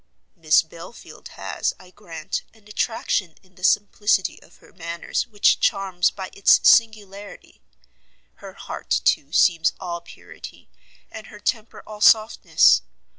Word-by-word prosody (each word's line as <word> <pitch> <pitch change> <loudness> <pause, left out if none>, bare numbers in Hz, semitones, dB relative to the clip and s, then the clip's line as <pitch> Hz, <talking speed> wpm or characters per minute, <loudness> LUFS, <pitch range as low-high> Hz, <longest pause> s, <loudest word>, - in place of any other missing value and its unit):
"Miss 160 -3 +3
Belfield 165 +8 -13
has, - - -4
I 185 0 -17
grant, 170 -5 -7
an 215 -2 -23
attraction 210 -5 -2
in 185 -1 -27
the 185 - -19
simplicity 205 0 0
of - - -21
her - - -22
manners 170 -1 -5
which 210 -3 +2
charms 190 -3 0
by 190 -2 -9
its 200 - +4
singularity; 205 -3 0 0.8
her - - -12
heart, - - -10 0.2
too, - - +1
seems 165 -3 +2
all 170 -2 -6
purity, - - -14 0.4
and 220 - -10
her 210 - -14
temper 220 +1 -4
all 210 -1 -11
softness. 220 0 +4
195 Hz, 130 wpm, -22 LUFS, 175-210 Hz, 0.8 s, its